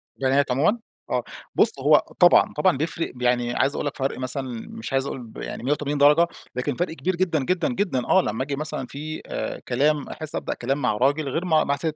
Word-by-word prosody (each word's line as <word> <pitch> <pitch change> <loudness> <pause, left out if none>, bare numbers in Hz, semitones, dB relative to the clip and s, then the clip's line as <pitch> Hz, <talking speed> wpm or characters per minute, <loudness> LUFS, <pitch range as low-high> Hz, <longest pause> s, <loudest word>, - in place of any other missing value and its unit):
بنات 135 +1 +1
عمومًا؟ 160 - +2 0.3
آه، - - 0 0.3
بُص - - +5
هو - - +5 0.2
طبعًا، - - +6
طبعًا 185 -7 +2
بيفرِق، 165 +3 -2
ب 125 - -12
يعني 120 -1 +1
عايز 135 +2 +1
أقول - - -3
لك 145 - -3
فرْق 135 0 -2
مثلًا 130 -2 -3
مش 115 - -7
عايز 135 0 +1
أقول 130 -3 -5
ب 110 - -13
يعني - - -6
180 145 +2 -1
درجة، 150 +4 +5 0.3
لكن 125 +2 -2
فرْق 175 +1 -2
كبير 185 +2 -2
جدًا، 170 -6 0
جدًا، 180 - 0
جدًا 175 - -1
آه، 190 - +5
لمّا 130 -6 -2
آجي 140 0 -3
مثلًا 155 -2 -4
في 155 +4 -6
آآ - - -4
كلام، 145 +4 +1
أحسّ 155 -1 -5
أبدأ - - -2
كلام 135 +3 -2
مع 115 -4 +1
راجل 140 +4 +1
غير 165 +7 -2
مع 160 -3 +3
مع 140 - 0
ست. 155 +2 -3
140 Hz, 220 wpm, -24 LUFS, 130-155 Hz, 0.3 s, طبعًا